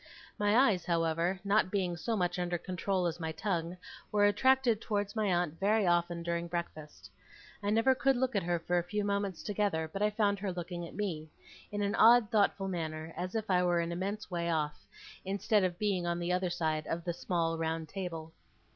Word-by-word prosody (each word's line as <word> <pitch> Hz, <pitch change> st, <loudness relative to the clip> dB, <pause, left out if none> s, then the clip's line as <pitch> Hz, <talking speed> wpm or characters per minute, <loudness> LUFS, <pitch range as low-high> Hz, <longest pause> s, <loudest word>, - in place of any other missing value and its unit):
My 205 Hz, +2 st, +3 dB
eyes, 215 Hz, -10 st, +4 dB
however, 170 Hz, +2 st, 0 dB
not 200 Hz, -1 st, +2 dB
being 185 Hz, -3 st, -1 dB
so 220 Hz, +6 st, -2 dB
much 180 Hz, -1 st, 0 dB
under 175 Hz, 0 st, -1 dB
control 185 Hz, +1 st, -2 dB
as 170 Hz, 0 st, -2 dB
my 160 Hz, -1 st, -3 dB
tongue, 170 Hz, 0 st, -2 dB, 0.3 s
were 205 Hz, -1 st, +4 dB
attracted 240 Hz, +2 st, +3 dB
towards 205 Hz, -2 st, -2 dB
my 215 Hz, -2 st, +1 dB
aunt 175 Hz, -3 st, 0 dB
very 210 Hz, +1 st, +3 dB
often 175 Hz, -1 st, +1 dB
during 170 Hz, 0 st, -2 dB
breakfast. 155 Hz, -, -6 dB, 0.5 s
I 205 Hz, -, -1 dB
never 225 Hz, +5 st, +4 dB
could 270 Hz, +1 st, +2 dB
look 255 Hz, -1 st, 0 dB
at 200 Hz, -, +2 dB
her 175 Hz, 0 st, 0 dB
for 175 Hz, +1 st, 0 dB
a -, -, -2 dB
few 205 Hz, +4 st, -2 dB
moments 200 Hz, -2 st, -2 dB
together 200 Hz, -6 st, 0 dB
but 195 Hz, +5 st, -6 dB
I 210 Hz, -, +4 dB
found 205 Hz, -1 st, +1 dB
her 195 Hz, -1 st, -2 dB
looking 175 Hz, -1 st, -5 dB
at -, -, -13 dB
me 165 Hz, -7 st, -3 dB, 0.4 s
in 205 Hz, 0 st, -2 dB
an 200 Hz, +1 st, 0 dB
odd 230 Hz, -1 st, +6 dB
thoughtful 200 Hz, -2 st, +2 dB
manner, 160 Hz, -3 st, -4 dB
as 180 Hz, +4 st, -4 dB
if 220 Hz, -1 st, -2 dB
I 180 Hz, -1 st, +4 dB
were 175 Hz, -1 st, +2 dB
an 170 Hz, 0 st, -1 dB
immense 195 Hz, +4 st, -4 dB
way 170 Hz, -1 st, -1 dB
off, 150 Hz, -2 st, -2 dB, 0.4 s
instead 200 Hz, +2 st, +1 dB
of 180 Hz, -2 st, -1 dB
being 190 Hz, -4 st, 0 dB
on 170 Hz, 0 st, 0 dB
the 175 Hz, +1 st, -1 dB
other 180 Hz, 0 st, 0 dB
side 155 Hz, -3 st, -1 dB
of 165 Hz, +1 st, -3 dB
the 175 Hz, 0 st, -2 dB
small 165 Hz, -1 st, -1 dB
round 160 Hz, 0 st, -2 dB
table. 165 Hz, -3 st, -6 dB
180 Hz, 205 wpm, -32 LUFS, 170-205 Hz, 0.5 s, odd